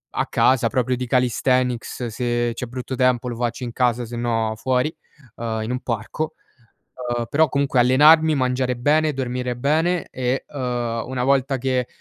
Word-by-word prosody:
a -, -, +1 dB
casa 125 Hz, -3 st, +3 dB
proprio 125 Hz, +1 st, 0 dB
di 125 Hz, 0 st, -4 dB
calisthenics, 125 Hz, 0 st, 0 dB
se 120 Hz, +1 st, -1 dB
c'è 125 Hz, -, -5 dB
brutto 125 Hz, +2 st, -6 dB
tempo 125 Hz, -1 st, +2 dB
lo 120 Hz, -, -4 dB
faccio 120 Hz, +1 st, -3 dB
in 120 Hz, -, -4 dB
casa 120 Hz, -1 st, +1 dB
sennò 115 Hz, -2 st, -1 dB
fuori, 130 Hz, +7 st, 0 dB, 0.4 s
uhm, 115 Hz, -1 st, -3 dB
in 110 Hz, -, -4 dB
un 125 Hz, -, -2 dB
parco. 120 Hz, +8 st, -3 dB, 0.8 s
Uhm, 120 Hz, -1 st, -2 dB
però 155 Hz, +3 st, +3 dB
comunque 140 Hz, -2 st, 0 dB
allenarmi, 150 Hz, +6 st, +6 dB
mangiare 130 Hz, -1 st, 0 dB
bene, 150 Hz, +5 st, +2 dB
dormire 125 Hz, -1 st, -3 dB
bene 160 Hz, +7 st, +1 dB
e, 125 Hz, +1 st, -2 dB
uhm, 120 Hz, -4 st, -3 dB
una 130 Hz, -1 st, -3 dB
volta 135 Hz, 0 st, +2 dB
che 130 Hz, -1 st, 0 dB
125 Hz, 160 wpm, -22 LUFS, 120-135 Hz, 0.8 s, allenarmi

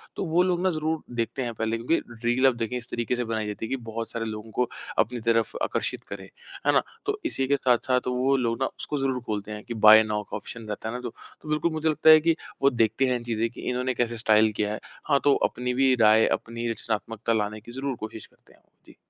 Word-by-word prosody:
तो -, -, -3 dB
वो 170 Hz, +2 st, +3 dB
लोग 180 Hz, -1 st, 0 dB
ना 185 Hz, -, +3 dB
ज़रूर 155 Hz, 0 st, -2 dB
देखते 120 Hz, +3 st, -2 dB
हैं 120 Hz, -1 st, -3 dB
पहले। 115 Hz, +1 st, -1 dB
क्योंकि 125 Hz, +9 st, +1 dB, 0.3 s
रील 120 Hz, +3 st, +3 dB
अब 130 Hz, -, +3 dB
देखें 115 Hz, +2 st, -2 dB
इस 120 Hz, -1 st, -7 dB
तरीके 120 Hz, +1 st, -1 dB
से 120 Hz, -, -1 dB
बनाई 110 Hz, -1 st, -2 dB
जाती 105 Hz, +1 st, -4 dB
है -, -, -7 dB
कि -, -, 0 dB
बहुत 115 Hz, 0 st, -4 dB
सारे 115 Hz, -1 st, -3 dB
लोगों 110 Hz, 0 st, -6 dB
को 125 Hz, +2 st, 0 dB, 0.3 s
अपनी 115 Hz, +2 st, +1 dB
तरफ 115 Hz, 0 st, +1 dB
आकर्षित -, -, -2 dB
करें, -, -, -7 dB, 0.4 s
है -, -, +6 dB
ना? -, -, +5 dB, 0.2 s
तो 415 Hz, +1 st, -1 dB
इसी 135 Hz, -, -1 dB
के 140 Hz, -, +3 dB
साथ-साथ 125 Hz, -1 st, +1 dB
वो 125 Hz, +2 st, +2 dB
लोग 115 Hz, -2 st, -1 dB
ना, -, -, +3 dB
उसको 150 Hz, -, -4 dB
ज़रूर 135 Hz, -2 st, 0 dB
खोलते 105 Hz, -1 st, -4 dB
हैं 105 Hz, 0 st, -7 dB
कि 120 Hz, -, -6 dB
बाय 110 Hz, 0 st, +8 dB
नाउ 105 Hz, -1 st, -2 dB
का -, -, -6 dB
ऑप्शन 115 Hz, -1 st, -8 dB
रहता 105 Hz, +1 st, -4 dB
है 115 Hz, -, -5 dB
ना -, -, -3 dB
दो 125 Hz, -, -4 dB, 0.3 s
तो 155 Hz, -, -10 dB
बिल्कुल 155 Hz, +2 st, +1 dB
मुझे 160 Hz, 0 st, 0 dB
लगता 155 Hz, +1 st, +3 dB
है 155 Hz, 0 st, +10 dB
कि, 165 Hz, +1 st, +2 dB, 0.3 s
वो 135 Hz, -, +6 dB
देखते 115 Hz, 0 st, +1 dB
हैं 125 Hz, -, +1 dB
इन 120 Hz, -, -4 dB
चीज़ें 115 Hz, -1 st, -1 dB
कि 120 Hz, -, -11 dB
इन्होंने 125 Hz, +1 st, -1 dB
कैसे 120 Hz, -1 st, -1 dB
स्टाइल 110 Hz, -1 st, +4 dB
किया 105 Hz, 0 st, -1 dB
है। 110 Hz, -, -5 dB, 0.3 s
हाँ, 140 Hz, -2 st, +4 dB
तो 145 Hz, -1 st, +5 dB
अपनी 125 Hz, +1 st, -3 dB
भी 130 Hz, +1 st, +3 dB
राय, 110 Hz, +1 st, +6 dB
अपनी 115 Hz, 0 st, -2 dB
रचनात्मकता 115 Hz, 0 st, -2 dB
लाने 105 Hz, -1 st, -1 dB
की 120 Hz, -, -12 dB
ज़रूर 135 Hz, +1 st, -3 dB
कोशिश 110 Hz, 0 st, -7 dB
करते -, -, -25 dB
हैं -, -, -25 dB
वो। -, -, -38 dB
जी। -, -, -17 dB
120 Hz, 255 wpm, -26 LUFS, 110-135 Hz, 0.4 s, है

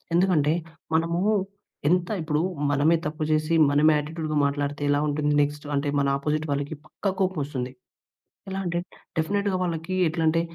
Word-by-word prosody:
ఎందుకంటే 170 Hz, -5 st, +3 dB, 0.4 s
మనము 165 Hz, +1 st, +1 dB, 0.7 s
ఎంత 175 Hz, 0 st, +2 dB, 0.2 s
ఇప్పుడు 150 Hz, -1 st, 0 dB, 0.3 s
మనమే 155 Hz, +4 st, +4 dB
తప్పు 155 Hz, +1 st, -4 dB
చేసి, 155 Hz, +2 st, +1 dB, 0.2 s
మనమే 150 Hz, +2 st, +5 dB
యాటిట్యూడ్‌గా 155 Hz, 0 st, -3 dB
మాట్లాడితే 145 Hz, 0 st, -2 dB
ఎలా 145 Hz, -, +3 dB
ఉంటుంది? 150 Hz, 0 st, +1 dB
నెక్స్ట్ 145 Hz, +1 st, -4 dB
అంటే 140 Hz, +1 st, 0 dB
మన 140 Hz, -, +1 dB
అపోజిట్ 155 Hz, +2 st, -1 dB
వాళ్ళకి 145 Hz, +2 st, -3 dB
పక్కా 200 Hz, -, -3 dB
కోపమొస్తుంది. 145 Hz, -9 st, -1 dB, 0.8 s
ఎలా 190 Hz, 0 st, -3 dB
అంటే 175 Hz, -1 st, -1 dB, 0.4 s
డెఫినిట్‌గా 200 Hz, +4 st, 0 dB
వాళ్ళకి 170 Hz, 0 st, -2 dB
ఎట్లా 160 Hz, +1 st, -1 dB
అంటే, 165 Hz, +1 st, +3 dB
155 Hz, 140 wpm, -25 LUFS, 145-170 Hz, 0.8 s, మనమే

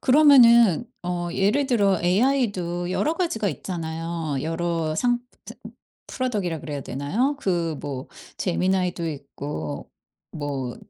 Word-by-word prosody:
그러면은 245 Hz, -, +6 dB, 0.2 s
어 175 Hz, -1 st, -2 dB
예를 210 Hz, +10 st, +2 dB
들어 200 Hz, -7 st, +2 dB
AI도 185 Hz, -4 st, +1 dB
여러 310 Hz, -, +1 dB
가지가 275 Hz, -, -1 dB
있잖아요. 165 Hz, -2 st, -4 dB
여러 165 Hz, 0 st, -1 dB
상 245 Hz, +5 st, +2 dB, 0.3 s
상 -, -, -10 dB, 0.5 s
product이라고 205 Hz, -, -2 dB
그래야 145 Hz, -2 st, -4 dB
되나요? 195 Hz, -, -1 dB
그 170 Hz, -4 st, 0 dB
뭐 135 Hz, -2 st, -6 dB, 0.3 s
제미나이도 180 Hz, -2 st, 0 dB
있고 140 Hz, -, -6 dB, 0.4 s
뭐 140 Hz, -5 st, -4 dB
175 Hz, 280 characters per minute, -24 LUFS, 160-230 Hz, 0.5 s, 그러면은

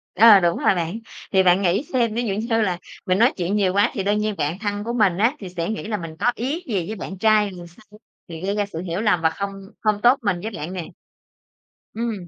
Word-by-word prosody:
Ờ, 220 Hz, -2 st, +8 dB
đúng 170 Hz, -2 st, +1 dB
rồi -, -, +2 dB
bạn, 175 Hz, +5 st, -3 dB, 0.3 s
thì 190 Hz, -1 st, +4 dB
bạn 180 Hz, +1 st, +4 dB
nghĩ 190 Hz, +7 st, +1 dB
xem, 235 Hz, -4 st, +1 dB
ví 240 Hz, +2 st, -1 dB
dụ 200 Hz, -4 st, -1 dB
như 225 Hz, +2 st, 0 dB
là 185 Hz, -4 st, 0 dB, 0.3 s
mình 185 Hz, 0 st, +1 dB
nói 235 Hz, +3 st, +5 dB
chuyện 180 Hz, +3 st, -1 dB
nhiều 190 Hz, -3 st, +2 dB
quá 205 Hz, +1 st, +3 dB
thì 195 Hz, -, -2 dB
đương 205 Hz, +2 st, +1 dB
nhiên 210 Hz, -1 st, -1 dB
bạn 155 Hz, +6 st, -2 dB
thân 205 Hz, -1 st, -3 dB
của 235 Hz, -, -3 dB
mình 205 Hz, -7 st, +2 dB
á, 230 Hz, +8 st, +2 dB
thì 190 Hz, -3 st, -7 dB
sẽ 170 Hz, 0 st, -4 dB
nghĩ 220 Hz, -, -3 dB
là 215 Hz, -2 st, -2 dB
mình 165 Hz, -3 st, -8 dB
có 245 Hz, -, +3 dB
ý 285 Hz, +9 st, -3 dB
gì 195 Hz, -7 st, -2 dB
với 220 Hz, -, -4 dB
bạn 190 Hz, -1 st, -7 dB
trai 215 Hz, 0 st, +3 dB
thì 185 Hz, -, -11 dB
sao, 210 Hz, +4 st, -19 dB, 0.3 s
thì 165 Hz, -2 st, -8 dB
gây 195 Hz, +2 st, -1 dB
ra 205 Hz, -1 st, 0 dB
sự 170 Hz, -5 st, -7 dB
hiểu 180 Hz, +1 st, -3 dB
lầm 205 Hz, -7 st, +2 dB
và 160 Hz, -, +3 dB
không 200 Hz, +4 st, -4 dB, 0.3 s
không 210 Hz, -1 st, +1 dB
tốt 245 Hz, +4 st, +5 dB
mình 200 Hz, -5 st, 0 dB
với 220 Hz, +3 st, -4 dB
bạn 175 Hz, -2 st, -6 dB
nè. 175 Hz, -3 st, -5 dB, 1.1 s
Ừm. 230 Hz, +1 st, -2 dB
205 Hz, 260 wpm, -22 LUFS, 180-220 Hz, 1.1 s, Ờ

